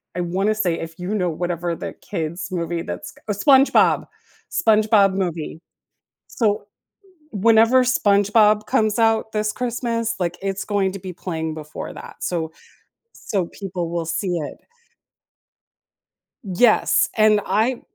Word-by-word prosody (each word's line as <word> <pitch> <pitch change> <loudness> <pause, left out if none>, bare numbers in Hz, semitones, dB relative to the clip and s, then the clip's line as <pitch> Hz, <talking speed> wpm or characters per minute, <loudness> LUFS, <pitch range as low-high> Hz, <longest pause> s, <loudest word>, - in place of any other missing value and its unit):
I 180 - -1
want 185 +4 -1
to 215 - +1
say 180 -6 0
if 165 0 -7
you 180 +4 -3
know 180 -3 0
whatever 170 +1 -2
the - - -6
kid's 170 +4 -5
movie 170 -1 -2
that's - - -6
co - - -22
Oh, - - +2
SpongeBob! 265 +7 +4 0.4
SpongeBob 215 -3 +3
movie. 170 -4 -3 0.7
So, 210 -4 0 0.7
whenever 225 +4 +5
SpongeBob 210 -2 +3
comes 215 -4 +1
out 225 -1 +2
this 215 0 -1
Christmas, 230 0 -2
like 175 -1 -2
it's 195 0 -3
going 200 -2 0
to 195 - -6
be 185 0 -7
playing 160 -3 -4
before 155 -1 -7
that. - - -10
So 160 -2 -2 0.6
so 190 -5 -3
people 180 -4 -5
will 170 -1 -2
see 180 +2 -2
it. 150 -3 -5 1.9
Yes, 210 +4 +3
and 215 -1 +5
I 235 +4 0
195 Hz, 135 wpm, -21 LUFS, 175-215 Hz, 1.9 s, whenever